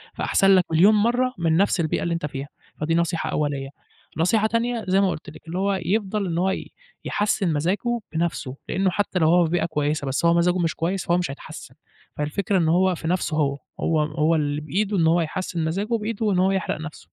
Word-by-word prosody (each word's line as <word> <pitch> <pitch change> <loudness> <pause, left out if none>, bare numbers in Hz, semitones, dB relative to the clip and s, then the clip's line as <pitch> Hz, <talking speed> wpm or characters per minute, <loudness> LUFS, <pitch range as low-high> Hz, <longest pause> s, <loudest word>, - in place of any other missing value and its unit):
فأحسن 195 - +2
لك 180 - +3
مليون 185 +7 +6
مَرّة 245 +4 +2
من 165 -1 +2
نفْس 195 -1 +2
البيئة 155 -2 0
اللي 170 0 -1
أنت 165 - -3
فيها، 140 0 -6 0.3
فدي 165 +2 +1
نصيحة 170 -1 0
أولية، 140 -2 -2 0.5
نصيحة 210 +6 +2
تانية 230 0 -1
زي 190 +2 +3
ما 195 - +3
قُلت 155 - -5
لِك 155 +2 -14
اللي 175 +3 -4
هو 200 0 +1
يفضل 205 0 0
إن 170 0 -2
هو 190 +2 +2
ي - - -5 0.3
يحسِّن 200 -5 0
مزاجه 200 +10 0
بنفْسه، 160 -5 -2
لإنه 190 +1 +1
حتّى 195 -2 -1
لو 160 -1 +4
هو 175 0 +5
في 160 - -3
بيئة 175 - +1
كويسة 150 -2 -1
بس 135 +5 -1
هو 170 - +5
مزاجه 175 +1 +2
مش 165 -2 0
كويس، 180 +3 -2
فهو 175 +1 +3
مش 170 -6 -1
هيتحسِّن، 140 - -10 0.4
فالفكرة 185 +7 -1
إن 160 -1 +2
هو 185 +1 +3
في 160 - -6
نفْسه 175 -3 0
هو، 140 -2 +1 0.2
هو 160 -2 +1
هو 155 +2 +1
اللي 145 -1 -1
بإيده 195 +7 -1
إن 165 -2 +3
هو 170 +1 +3
يحسِّن 165 0 -3
مزاجه 195 +6 -2
بإيده 220 0 -2
وإن 190 -3 +2
هو 190 +1 +3
يحرق 190 -4 -2
نفْسه. 150 - -9
170 Hz, 215 wpm, -23 LUFS, 155-195 Hz, 0.5 s, مليون